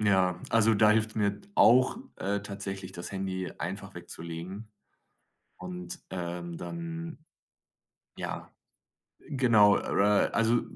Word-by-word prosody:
ja, 95 -4 +3
also 115 0 +4
da 105 +1 +5
hilft’s 110 0 +2
mir 100 -1 0
auch, 130 - +6 0.2
äh, 100 +1 -1
tatsächlich, 100 -2 -6
das 85 0 -7
Handy 95 -2 -3
einfach 95 +3 -5
wegzulegen, 85 +4 -7 0.9
und, 90 -1 -7
ähm, 85 -1 -4
dann 165 -1 -6 1.0
ja, - - -5 0.7
genau, 115 -7 +4
äh 105 +1 +2
also 115 +1 +3
100 Hz, 105 wpm, -29 LUFS, 90-110 Hz, 1.0 s, auch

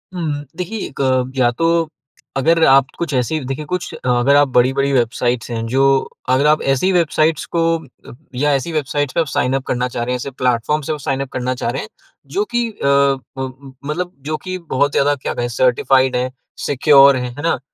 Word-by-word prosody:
हुँ, 150 -4 -3
देखिए 185 +5 -4
1 135 - -14 0.4
या 125 -2 +3
तो 165 +4 +1 0.5
अगर 165 +4 +3
आप 135 0 +5
कुछ 170 -4 -3
ऐसी 130 +5 0
देखिए, 135 +4 -4
कुछ 180 +4 -4
अगर 125 +2 +2
आप 145 0 +5
बड़ी-बड़ी 135 +2 +2
वेबसाइट्स 120 -1 0
हैं, 115 -1 -3
जो 135 +2 +2 0.2
अगर 130 +3 +3
आप 155 0 +3
ऐसी 185 +9 +1
वेबसाइट्स 160 -3 +1
को 170 - +3 0.7
या 145 +4 +1
ऐसी 135 +5 -2
वेबसाइट्स 145 -2 -1
पे 165 - +2
साइन 125 - 0
अप 135 - -2
करना 125 0 0
चाह 120 -1 -4
रहे 125 +1 -2
हैं, - - 0
ऐसे 140 - -5
प्लेटफ़ॉर्म 125 +3 0
से 155 - -1
साइन 135 0 -1
अप 135 - -5
करना 125 0 -1
चाह 120 - -3
रहे 135 - -3
हैं, - - -8 0.5
जो 205 - +2
कि 240 -1 +1
अ, 140 -7 +2 0.7
मतलब 175 +5 -3 0.2
जो 155 - -1
कि 185 0 -4 0.2
बहुत 140 +2 +2
ज़्यादा 145 +1 +2
क्या 135 - -4
कहें, 120 - -2
सर्टिफ़ाइड 130 +2 +2
है, 125 +1 -1 0.3
सिक्योर 140 0 +6
हैं, 125 -1 -3
है 145 - -7
ना? 165 - +1
135 Hz, 195 wpm, -18 LUFS, 125-155 Hz, 0.7 s, सिक्योर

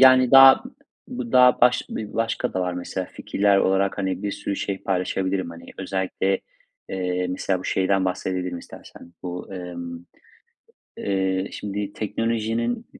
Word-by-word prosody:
yani, 130 -1 +7
daha, 135 0 +9 0.4
bu 250 -1 -6
daha 125 -1 +6
baş 125 0 +5
bir 105 -1 -6
başka 115 0 -1
da 95 - 0
var, 90 -1 -1
mesela, 90 +1 -4
fikirler 100 0 +1
olarak, 95 +1 +1
hani, 95 -1 -2
bir 100 -1 -2
sürü 100 - -4
şey 95 -1 -3
paylaşabilirim, 95 0 -1
hani, 85 0 -11
özellikle, 95 0 -1 0.5
eee, 90 -1 -1
mesela 95 0 -1
bu 95 - -10
şeyden 95 0 +1
bahsedebilirim 90 -1 -2
istersen, 85 0 -13
bu, 90 +1 -6
emm, 85 -1 -7 0.9
eee, 95 -1 -1
şimdi 100 0 -4
teknolojinin 115 +2 -2
95 Hz, 140 wpm, -24 LUFS, 90-110 Hz, 0.9 s, daha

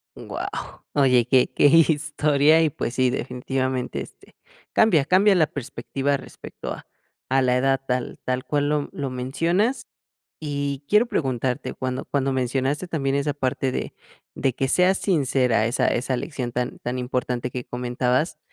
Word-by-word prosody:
Guau, - - -5 0.5
oye, 125 -4 +4
que 130 -1 +4
que - - +2
historia 150 0 +4
y, 160 - +3
pues 125 -3 -4
sí, 130 0 +2
definitivamente, 130 0 -2
este, - - -13 0.4
cambia 165 -11 +4
cambia 195 +5 +5
la 160 -3 +4
perspectiva 140 +1 -2
respecto - - -9
a - - -7 0.4
a 135 0 +3
la 125 -1 +2
edad 135 +1 +2
tal 125 -1 -2
tal 130 +1 -2
cual 145 -1 0
lo 150 -1 0
lo 140 -2 -4
mencionas, 165 - 0 0.5
y 140 -2 -3
quiero 210 +6 +5
preguntarte 130 - -2
cuando 130 0 -4
cuando 135 -1 0
mencionaste 135 +6 -1
también 140 -5 0
esa 145 0 0
parte 130 -1 -1
de - - -4 0.4
de 130 -3 0
que 135 0 -1
seas 185 +4 +3
sincera 130 - +2
esa 125 +2 +1
esa 130 +1 0
lección 130 -2 -4
tan 125 +1 -3
tan 125 +1 -4
importante 125 0 -2
que 125 0 -5
comentabas. 125 +5 -1
135 Hz, 150 wpm, -23 LUFS, 125-150 Hz, 0.5 s, cambia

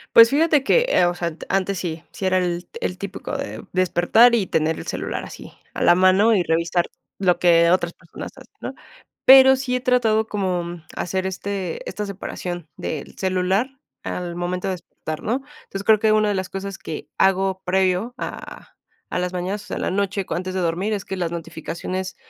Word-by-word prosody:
Pues 230 +1 +9
fíjate 300 -1 +3
que, 485 - +4
eh, 180 - +4
o 175 - +1
sea, 175 -1 -3
ant 165 -1 -7
antes 195 0 0
sí, 165 -2 -4
sí 195 - -5
era 185 0 +3
el 175 -1 -2
el - - -2
típico - - -5
de - - -6
despertar 185 +6 +4
y 215 -5 +2
tener 160 0 +1
el - - -9
celular - - -3
así, - - -10 0.2
a - - -1
la - - +7
mano 185 +5 +5
y 200 - +3
revisar 170 +1 +1 0.3
lo 180 -2 +3
que 170 -1 +5
otras 175 -1 +2
personas 165 - -10
hacen, - - -15
¿no? - - -5 0.5
Pero 265 0 +9
sí 255 -1 -1
he - - -2
tratado 225 -4 +2
como, 185 -4 -1
mm, 170 -1 -8
hacer 190 +1 -2
este 190 -2 -4
esta 210 - -4
separación 180 -4 -6
del 150 - -5
celular 190 +6 0 0.3
al 175 -1 -4
momento 180 +1 -2
de - - 0
despertar, 155 -3 -7
¿no? 245 +5 0 0.2
Entonces, 195 0 -6
creo 220 0 +6
que 215 0 +3
una 215 0 +3
de 205 - +1
las 190 -1 -3
cosas 195 0 -5
que 155 - -7
hago 190 0 +2
previo 185 +4 +1
a - - -8 0.4
a - - 0
las 180 0 -1
mañanas, 185 +3 -3
o - - -16
sea, - - -5
en - - -3
la - - 0
noche 195 0 -1
cu - - -3
antes 185 +1 -3
de 190 - 0
dormir, 180 +5 -1
es 205 -3 -2
que 190 - -4
las 175 -2 -2
notificaciones 170 +3 -5
185 Hz, 205 wpm, -22 LUFS, 175-205 Hz, 0.5 s, Pues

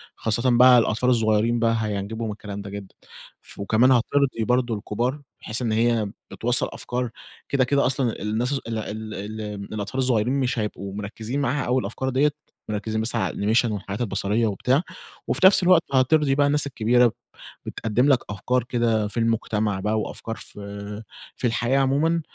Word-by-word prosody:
خاصةً 120 +3 0
بقى 125 0 +8
الأطفال 120 +2 +2
الصغيرين 115 0 +2
بقى 115 0 +2
هيعجبهم 110 +1 -3
الكلام 100 -1 -7
ده 100 - -8
جدًا، 100 -1 -9 0.5
ف - - -13
وكمان 110 +6 +3
هَتِرضي 130 0 +2
برضه 125 0 +1
الكُبّار 120 +7 -2 0.2
بحيث 110 +2 -4
إن 115 -3 -1
هي 110 -2 +1 0.2
بتوصّل 120 +1 +2
أفكار 125 0 -3 0.4
كده 140 -2 +2
كده 140 +2 +2
أصلًا 130 -3 0
الناس 110 +6 -1
ال 115 -5 -3
ال 110 0 -5
ال 110 +2 -6 0.3
الأطفال 105 +3 -4
الصغيّرين 125 -2 +1
مش 125 -2 0
هيبقوا 100 -2 -4
مركزِين 110 +6 -4
معاها 140 +1 0
أوي 125 +2 +2
الأفكار 115 +6 -3
ديَّة، 140 +3 +2 0.4
مركزين 110 +1 -2
بس 115 +2 0
على 115 - 0
الanimation 110 +4 +2
والحاجات 100 +1 -5
البصرية 105 +1 0
وبتاع، 125 +8 +1 0.5
وفي - - +2
نفْس 190 -1 +4
الوقت 180 -2 +5
هترضي 135 +2 +3
بقى 145 0 +3
الناس 145 0 +2
الكبيرة 120 -1 +3 0.5
بتقدِم 115 +5 0
لَك 135 -3 +5
أفكار 125 +5 -1
كده 115 -3 0
في 105 - -9
المجتمع 110 -3 0
بقى 105 +3 0
وأفكار 115 +1 -5
في 100 +1 -8 0.3
في 125 - 0
الحياة 120 +3 +1
عمومًا، 150 +5 +2
115 Hz, 165 wpm, -24 LUFS, 105-130 Hz, 0.5 s, بقى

